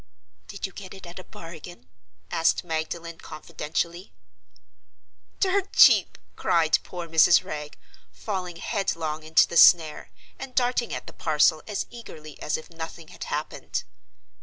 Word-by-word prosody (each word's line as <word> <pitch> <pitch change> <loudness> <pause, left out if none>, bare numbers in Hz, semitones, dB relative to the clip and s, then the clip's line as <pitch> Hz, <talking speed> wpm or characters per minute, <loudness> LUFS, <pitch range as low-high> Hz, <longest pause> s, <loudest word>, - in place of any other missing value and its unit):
"Did 200 - -5
you 195 - -6
get 190 0 -10
it 190 - -12
at 175 +1 -9
a - - -9
bargain?" 165 - -11 0.4
asked 165 +2 +2
Magdalen, 165 0 -4
confidentially. 165 - -5 1.3
"Dirt 390 0 +1
cheap!" - - +6 0.2
cried 160 -2 +2
poor 175 -2 -7
Mrs. 165 +1 +5
Wragge, 150 -1 -7 0.3
falling 185 -4 -5
headlong 165 -5 -2
into 155 +1 +4
the 170 - -2
snare, 160 -3 +6 0.3
and 265 -1 -8
darting 245 -1 +1
at - - -5
the - - -11
parcel 155 0 +2
as 210 -2 -2
eagerly 155 - -11
as 150 - -1
if 160 - -12
nothing 165 0 -8
had - - -8
happened. 150 +1 -4
170 Hz, 135 wpm, -25 LUFS, 155-190 Hz, 1.3 s, cheap